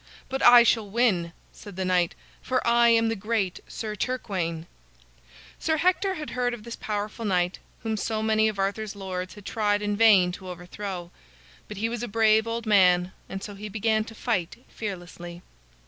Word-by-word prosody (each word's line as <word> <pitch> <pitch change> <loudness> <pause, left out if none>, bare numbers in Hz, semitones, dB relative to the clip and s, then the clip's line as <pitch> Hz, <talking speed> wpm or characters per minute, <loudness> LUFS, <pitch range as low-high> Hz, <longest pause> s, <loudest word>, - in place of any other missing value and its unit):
"But 270 +1 -3
I 245 0 +9
shall 225 -3 +2
win," 195 -7 +1 0.2
said 205 -3 -11
the 190 0 -2
knight, 180 -2 +1 0.3
"for 255 0 -1
I 235 0 +5
am 230 -1 +4
the 225 - 0
great 210 -3 -1
Sir 215 -2 -5
Turquaine." 185 -9 -3 0.9
Sir 315 0 0
Hector 370 +3 +1
had 300 -3 -6
heard 245 -1 -1
of 215 - -13
this 235 0 -7
powerful 210 +2 -4
knight 180 -3 0 0.2
whom 220 -1 -1
so 220 +1 -2
many 220 0 +3
of 215 -2 -2
Arthur's 200 +2 -2
lords 185 -2 -5
had 205 - -13
tried 210 -2 0
in 205 0 0
vain 205 -5 +5
to 185 0 -9
overthrow. 180 0 -6 0.6
But 210 - -8
he 220 +3 0
was 235 0 -4
a 240 - -3
brave 220 0 +3
old 230 0 -3
man, 180 -3 +4 0.2
and 195 0 -6
so 205 - -6
he 210 +2 -7
began 220 +1 +1
to 225 - -11
fight 230 +1 -2
fearlessly. 175 -4 -7
210 Hz, 180 wpm, -26 LUFS, 185-230 Hz, 0.9 s, I